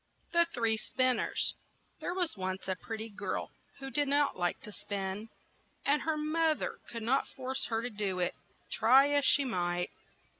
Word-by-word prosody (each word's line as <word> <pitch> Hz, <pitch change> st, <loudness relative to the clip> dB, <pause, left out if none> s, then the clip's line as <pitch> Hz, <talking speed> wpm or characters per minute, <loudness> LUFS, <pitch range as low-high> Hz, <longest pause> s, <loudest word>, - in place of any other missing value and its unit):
THE 340 Hz, 0 st, +5 dB
THREE 230 Hz, -9 st, +2 dB
SPINNERS 255 Hz, +2 st, +1 dB, 0.5 s
THERE 355 Hz, -, -3 dB
was 355 Hz, -3 st, +1 dB
once 190 Hz, -1 st, -4 dB
a 190 Hz, -, 0 dB
pret 220 Hz, +5 st, -6 dB
ty 220 Hz, -, -4 dB
girl 205 Hz, -, -4 dB, 0.3 s
who 270 Hz, -1 st, -7 dB
did 290 Hz, 0 st, +2 dB
not 285 Hz, +1 st, +3 dB
like 175 Hz, -1 st, -1 dB
to 210 Hz, -, -9 dB
spin, 200 Hz, +1 st, -4 dB, 0.6 s
and 290 Hz, +1 st, +3 dB
her 320 Hz, -1 st, 0 dB
moth 310 Hz, +1 st, +1 dB
er -, -, -4 dB
could 230 Hz, -2 st, -5 dB
not 255 Hz, +5 st, +2 dB
force 260 Hz, 0 st, -3 dB
her 225 Hz, 0 st, -1 dB
to 245 Hz, -, -1 dB
do 205 Hz, -3 st, -2 dB
it, 180 Hz, -1 st, 0 dB, 0.4 s
try 265 Hz, +6 st, +6 dB
as 285 Hz, -1 st, +3 dB
she 285 Hz, -, +5 dB
might. 175 Hz, -6 st, -1 dB
240 Hz, 180 wpm, -32 LUFS, 200-285 Hz, 0.6 s, try